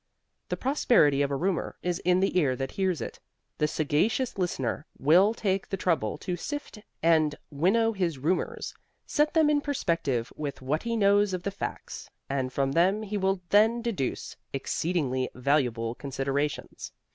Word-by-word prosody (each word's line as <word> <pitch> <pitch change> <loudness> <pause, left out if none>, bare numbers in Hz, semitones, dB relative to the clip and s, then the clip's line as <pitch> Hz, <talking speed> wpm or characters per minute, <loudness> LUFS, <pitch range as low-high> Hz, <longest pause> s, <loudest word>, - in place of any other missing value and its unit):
The - - -2
prosperity 235 - +3
of 140 - +1
a 140 - -1
rumor 180 +4 -1
is 180 -1 -1
in 180 +1 +2
the 195 - +1
ear 135 -6 +2
that 135 +1 -4
hears 190 -5 -1
it. - - -6 0.4
The 150 - +3
sagacious 160 - 0
listener 165 - -2
will 185 +10 +4
take 195 -3 -1
the 195 - -2
trouble 160 - 0
to 180 - -3
sift 290 - -6 0.2
and 160 -3 +4 0.2
winnow 195 +10 +2
his 175 -7 -1
rumors, 160 +8 -1 0.3
set 300 +2 +1
them 320 -2 +5
in 295 -1 +3
perspective 165 - -1
with 145 -2 -5
what 140 +4 -1
he 230 0 -2
knows 205 -1 +4
of 180 - -6
the 200 - -2
facts 200 - -6 0.2
and 135 -2 -2
from 135 +1 0
them 185 +8 +2
he 210 0 -4
will 190 -1 +1
then 225 +3 +4
deduce 200 - -3 0.2
exceedingly 135 -2 -1
valuable 125 -4 +1
considerations. 140 +2 -3
170 Hz, 160 wpm, -28 LUFS, 140-200 Hz, 0.4 s, them